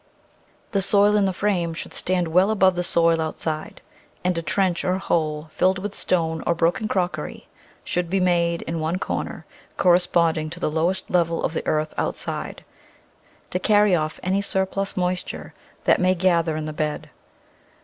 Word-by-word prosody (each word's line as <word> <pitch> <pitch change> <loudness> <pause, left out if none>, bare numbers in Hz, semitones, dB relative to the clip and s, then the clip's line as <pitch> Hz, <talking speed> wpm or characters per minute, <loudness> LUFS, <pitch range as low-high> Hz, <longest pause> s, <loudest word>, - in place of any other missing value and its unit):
The 200 - +1
soil 205 +2 +5
in 205 -1 +3
the 190 - +1
frame 180 -4 -1
should - - -7
stand 180 -2 0
well 180 +5 +4
above 190 -3 +4
the 175 - 0
soil 165 -1 +3
outside, 155 0 -4 0.4
and 180 0 +1
a 165 - -1
trench 185 0 0
or 185 0 +1
hole, 155 -4 -1
filled 185 +1 +2
with 200 +2 -5
stone 160 -4 0
or 170 - +2
broken 170 +6 +1
crockery, 185 -3 -3 0.4
should 175 -1 -2
be 195 +2 +1
made 170 -2 +1
in 165 0 -4
one 160 +3 -1
corner, - - -4 0.3
cor 180 - +4
responding 170 -3 +2
to - - -8
the - - -1
lowest 175 +4 -1
level 170 -2 +1
of - - -1
the - - -4
earth 155 0 0
outside, - - -4 0.9
to 180 - -1
carry 205 0 +4
off 155 -1 -2
any 190 +2 +1
surplus 195 0 -2
moisture 180 0 -3 0.3
that - - +3
may 185 +1 +3
gather 170 -3 +2
in 155 - -3
the 155 - -5
bed. 150 0 -3
175 Hz, 170 wpm, -23 LUFS, 165-190 Hz, 0.9 s, soil